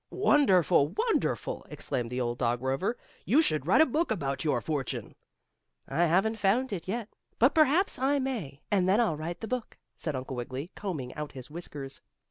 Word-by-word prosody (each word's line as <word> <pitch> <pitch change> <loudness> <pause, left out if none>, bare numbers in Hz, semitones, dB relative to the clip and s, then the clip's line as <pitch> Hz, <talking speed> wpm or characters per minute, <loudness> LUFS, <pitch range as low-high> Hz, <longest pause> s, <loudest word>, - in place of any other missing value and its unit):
"Wonderful! 195 - +4
Wonderful!" 475 +2 0
exclaimed 120 -2 -3
the 125 +1 -3
old 120 -1 -2
dog 120 0 0
Rover. 135 - 0 0.3
"You 260 +10 +4
should 155 - +2
write 195 - +6
a - - +7
book 320 +5 0
about 140 -10 -1
your 145 -6 +1
fortune." 145 -1 -3 0.7
"I 175 - +2
haven't 195 +7 +2
found 215 +5 +2
it 175 -3 -5
yet, 225 +2 -2 0.3
but 250 +5 +4
perhaps 315 +3 +3
I 275 +2 +2
may, 225 - -3
and 185 -3 +3
then 200 +4 +4
I'll 225 -10 +2
write 160 +3 -5
the 225 - -4
book," 250 -1 -4 0.2
said 155 -4 -3
Uncle 130 +1 -5
Wiggily, 130 +7 -5
combing 155 -11 -5
out 150 -1 -6
his 130 +1 -9
whiskers. 145 -5 -7
175 Hz, 180 wpm, -29 LUFS, -, 0.7 s, a